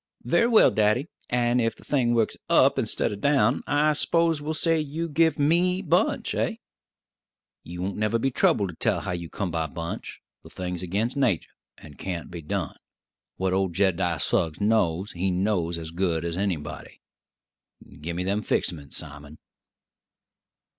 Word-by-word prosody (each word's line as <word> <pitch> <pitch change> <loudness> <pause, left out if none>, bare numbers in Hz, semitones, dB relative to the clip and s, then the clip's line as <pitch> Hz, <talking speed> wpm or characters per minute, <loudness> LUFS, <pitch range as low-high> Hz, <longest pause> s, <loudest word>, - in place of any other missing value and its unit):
"Very 230 - +3
well, 230 -2 +6
daddy; 110 +8 +1 0.2
and 120 0 +2
ef 115 0 0
the - - -17
thing 120 -5 +1
works 115 -2 +1
up - - +5
instid - - 0
o' - - -3
down, 140 +7 +2
I 150 +1 +3
s'pose 165 0 +2
we'll 155 +2 -3
say 165 0 +2
you 155 +3 -3
give 160 0 +2
me 175 +6 +2
Bunch, 175 0 +1
eh?" - - -1 1.1
"You 90 +1 -6
won't 95 +1 -3
never 110 +2 +1
be 135 +4 0
troubled 100 -5 +2
to 85 - -8
tell - - 0
how - - -4
you 85 -2 -5
come 100 -4 -3
by 80 -1 -1
Bunch; 85 +2 -6 0.2
the - - -14
thing's 90 -1 -5
agin 100 +6 -1
nater, 125 - +1 0.3
and 75 -2 -14
can't 90 -3 -5
be 85 -1 -6
done. 75 - -3 0.6
What 95 0 -1
old 95 -2 0
Jed'diah 90 -4 +1
Suggs 80 +1 0
knows, 100 -3 +1
he 90 +2 -1
knows 90 -2 0
as 80 -1 -7
good 85 -2 -1
as 85 -1 -2
anybody. 90 -6 -4 1.0
Give 85 +2 -4
me 90 - -2
them 100 +3 0
fix 90 - 0
ments, 70 -4 -8
Simon." 75 +1 -7
100 Hz, 165 wpm, -25 LUFS, 85-140 Hz, 1.1 s, well